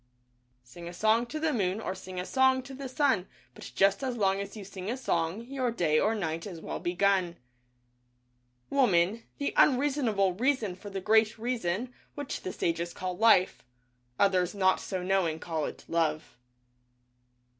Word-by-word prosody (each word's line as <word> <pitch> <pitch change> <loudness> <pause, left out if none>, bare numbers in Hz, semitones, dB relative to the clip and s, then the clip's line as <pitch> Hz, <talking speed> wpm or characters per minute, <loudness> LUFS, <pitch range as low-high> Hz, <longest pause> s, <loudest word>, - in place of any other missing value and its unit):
Sing 170 +8 -11
a - - -9
song 220 +5 +2
to 310 +6 -5
the 315 -1 0
moon 195 -3 0
Or 220 - -3
sing 185 -1 -8
a 180 - -3
song 260 +1 +3
to 270 - -10
the 270 0 -6
sun 260 -9 +1 0.3
But - - -10
just 195 +4 +3
as 255 -2 -2
long 195 -2 +2
as 200 +2 -6
you 200 - -8
sing 190 0 -7
a 245 - -2
song 170 -5 -1
Your 260 -1 -2
day 165 -9 +1
or 220 +2 +2
night 165 -3 -3
is 175 -5 -8
well - - -5
begun. 180 -1 +1 1.3
Woman, 205 -5 +3 0.2
the 285 - -2
unreasonable 250 -9 +3
Reason 230 -3 0
for 205 +2 -10
the 195 -1 -5
Great 220 +2 +3
Reason, 235 0 -2 0.2
which 290 -2 -5
the 185 - -4
sages 170 0 -2
call 185 -1 -4
Life 220 -3 +4 0.3
— 125 0 -42
Others 185 0 0
not 190 -1 +3
so 185 -2 -4
knowing 180 -4 +1
call 160 -2 -3
it - - -8
Love. 160 -4 -1
195 Hz, 170 wpm, -29 LUFS, 175-240 Hz, 1.3 s, Life